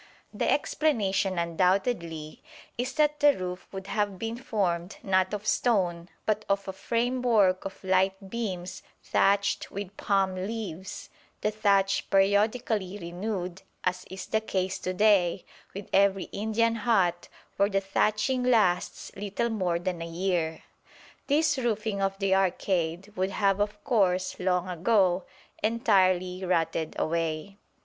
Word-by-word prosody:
The -, -, 0 dB
explanation 200 Hz, -, +1 dB
undoubtedly 170 Hz, -2 st, 0 dB, 0.3 s
is 255 Hz, +2 st, -3 dB
that 300 Hz, -1 st, +2 dB
the 290 Hz, -1 st, +5 dB
roof 180 Hz, 0 st, -5 dB
would 190 Hz, -1 st, -7 dB
have 200 Hz, -1 st, -1 dB
been 225 Hz, +3 st, -3 dB
formed 195 Hz, -8 st, -2 dB
not 190 Hz, -1 st, +2 dB
of 210 Hz, 0 st, -4 dB
stone 185 Hz, -7 st, +1 dB, 0.2 s
but 215 Hz, 0 st, 0 dB
of 200 Hz, 0 st, 0 dB
a 190 Hz, -, -4 dB
framework 230 Hz, -4 st, +1 dB
of 195 Hz, -, -7 dB
light 190 Hz, +1 st, +1 dB
beams 185 Hz, -6 st, -4 dB, 0.2 s
thatched 200 Hz, +1 st, +2 dB
with 200 Hz, 0 st, -6 dB
palm 195 Hz, -2 st, +1 dB
leaves, 190 Hz, -2 st, -5 dB, 0.3 s
the 210 Hz, -, +1 dB
thatch 200 Hz, -2 st, +2 dB
periodically 205 Hz, 0 st, +2 dB
renewed, 180 Hz, +1 st, -4 dB, 0.2 s
as 180 Hz, 0 st, -1 dB
is 190 Hz, 0 st, -7 dB
the 220 Hz, -, 0 dB
case 190 Hz, -3 st, -2 dB
to 185 Hz, -, -3 dB
day 195 Hz, -4 st, +3 dB, 0.3 s
with 200 Hz, 0 st, -6 dB
every 195 Hz, -1 st, +4 dB
Indian 220 Hz, +2 st, +1 dB
hut 190 Hz, -6 st, +1 dB, 0.3 s
where 200 Hz, +1 st, +3 dB
the 195 Hz, -1 st, +1 dB
thatching 215 Hz, +6 st, +1 dB
lasts 215 Hz, -8 st, +1 dB
little 205 Hz, +4 st, -2 dB
more 185 Hz, -6 st, 0 dB
than 175 Hz, 0 st, -3 dB
a 165 Hz, -, -4 dB
year. 170 Hz, -2 st, -1 dB, 0.6 s
This 300 Hz, 0 st, +2 dB
roofing 215 Hz, -4 st, -1 dB
of 195 Hz, 0 st, 0 dB
the 195 Hz, -1 st, +1 dB
arcade 185 Hz, 0 st, 0 dB
would 185 Hz, +1 st, 0 dB
have 195 Hz, 0 st, +1 dB
of 205 Hz, 0 st, -2 dB
course 185 Hz, -7 st, +1 dB
long 180 Hz, -1 st, +1 dB
ago 185 Hz, 0 st, +2 dB, 0.4 s
entirely 190 Hz, -5 st, +2 dB
rotted 165 Hz, -3 st, 0 dB
away. 165 Hz, +4 st, -2 dB
195 Hz, 135 wpm, -28 LUFS, 180-215 Hz, 0.6 s, the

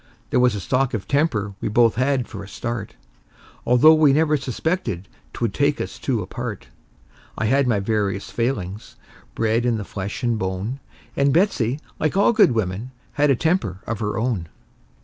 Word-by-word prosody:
There -, -, +3 dB
was 125 Hz, -3 st, +3 dB
a -, -, -3 dB
stock 125 Hz, +7 st, 0 dB
of 105 Hz, -, -5 dB
temper 130 Hz, -9 st, 0 dB
we -, -, -1 dB
both 115 Hz, +1 st, +4 dB
had 130 Hz, +1 st, 0 dB
for 100 Hz, -1 st, -8 dB
a -, -, -10 dB
start, 115 Hz, 0 st, -5 dB, 0.7 s
Although 125 Hz, +6 st, +7 dB
we 155 Hz, -3 st, +5 dB
never 155 Hz, +1 st, +3 dB
suspected 130 Hz, -, -2 dB, 0.2 s
'twould 115 Hz, -5 st, -2 dB
take 145 Hz, 0 st, +1 dB
us -, -, -5 dB
two 120 Hz, -7 st, -1 dB
apart; 110 Hz, +1 st, -6 dB, 0.7 s
I 110 Hz, -, -1 dB
had 135 Hz, +4 st, +3 dB
my 110 Hz, -4 st, +2 dB
various 100 Hz, -1 st, -1 dB
failings, 105 Hz, -5 st, -3 dB, 0.4 s
bred 115 Hz, +1 st, +1 dB
in 120 Hz, -2 st, +1 dB
the 105 Hz, -, -5 dB
flesh 100 Hz, +4 st, -5 dB
and 120 Hz, -2 st, +1 dB
bone; 95 Hz, +7 st, -3 dB, 0.4 s
And 140 Hz, 0 st, +3 dB
Betsey, 145 Hz, -, +1 dB, 0.2 s
like 155 Hz, +4 st, 0 dB
all 200 Hz, +4 st, +4 dB
good 210 Hz, -, +5 dB
women, 105 Hz, +2 st, -2 dB, 0.2 s
had 145 Hz, 0 st, +2 dB
a 135 Hz, -, +5 dB
temper 120 Hz, -, 0 dB
of 115 Hz, -2 st, -3 dB
her 105 Hz, -1 st, -2 dB
own. 110 Hz, -8 st, -1 dB
120 Hz, 175 wpm, -22 LUFS, 105-140 Hz, 0.7 s, Although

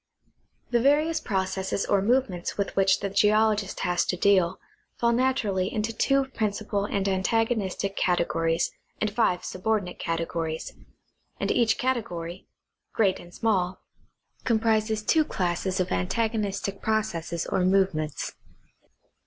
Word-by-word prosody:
The 240 Hz, -, +3 dB
various 300 Hz, +5 st, +3 dB
processes 190 Hz, -5 st, -1 dB
or 200 Hz, -1 st, +2 dB
movements 205 Hz, -5 st, 0 dB
with 200 Hz, -, -2 dB
which 195 Hz, 0 st, +3 dB
the 200 Hz, -, -1 dB
geologist 210 Hz, 0 st, +2 dB
has 175 Hz, 0 st, +1 dB
to 180 Hz, -, -1 dB
deal 185 Hz, -2 st, +3 dB, 0.4 s
fall 235 Hz, 0 st, +2 dB
naturally 235 Hz, -7 st, +1 dB
into 220 Hz, +1 st, -2 dB
two 275 Hz, +4 st, +2 dB
principal 210 Hz, -3 st, -2 dB
and 200 Hz, -1 st, -1 dB
antagonistic 200 Hz, 0 st, 0 dB
cate 175 Hz, -2 st, +1 dB
gories 165 Hz, 0 st, 0 dB, 0.3 s
and 215 Hz, -, 0 dB
five 200 Hz, -5 st, +1 dB
subordinate 190 Hz, -1 st, -2 dB
categ^ories; 165 Hz, -1 st, -3 dB, 0.7 s
and -, -, 0 dB
each 225 Hz, -2 st, +3 dB
category, 190 Hz, -9 st, -3 dB, 0.5 s
great 200 Hz, -4 st, +2 dB
and 175 Hz, -, -13 dB
small, 185 Hz, -3 st, 0 dB, 0.6 s
comprises 220 Hz, -2 st, +1 dB
two 315 Hz, +7 st, +4 dB
classes 185 Hz, -, -2 dB
of 185 Hz, -, -1 dB
antagonistic 200 Hz, -, -1 dB
processes 175 Hz, -6 st, -1 dB
or 185 Hz, -, 0 dB
movements. 185 Hz, -5 st, +1 dB
200 Hz, 120 wpm, -26 LUFS, 180-220 Hz, 0.7 s, two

